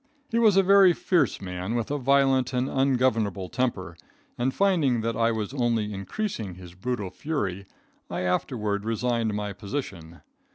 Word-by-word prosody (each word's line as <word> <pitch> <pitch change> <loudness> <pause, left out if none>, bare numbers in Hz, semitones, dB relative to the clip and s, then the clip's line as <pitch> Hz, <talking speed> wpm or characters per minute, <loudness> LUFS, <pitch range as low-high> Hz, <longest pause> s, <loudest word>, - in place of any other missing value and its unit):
He 230 - +2
was 215 -4 +5
a 195 - +6
very 195 -1 +6
fierce 175 0 +1
man, 90 +3 -4
with 120 +2 -2
a 145 - -1
violent 135 -1 +3
and 125 +1 0
ungovernable 120 -9 +1
temper, 115 -8 -2 0.4
and, 125 +2 0
finding 155 - +2
that 115 0 -2
I 115 0 +2
was 110 +1 -3
only 115 -5 0
increasing 100 - -4
his 90 -1 -12
brutal 100 0 -4
fury, 100 - -3 0.4
I 90 +1 -3
afterward 100 +3 -1
resigned 115 -1 -1
my 105 -1 -3
position. 100 - -6
115 Hz, 155 wpm, -26 LUFS, 100-135 Hz, 0.4 s, a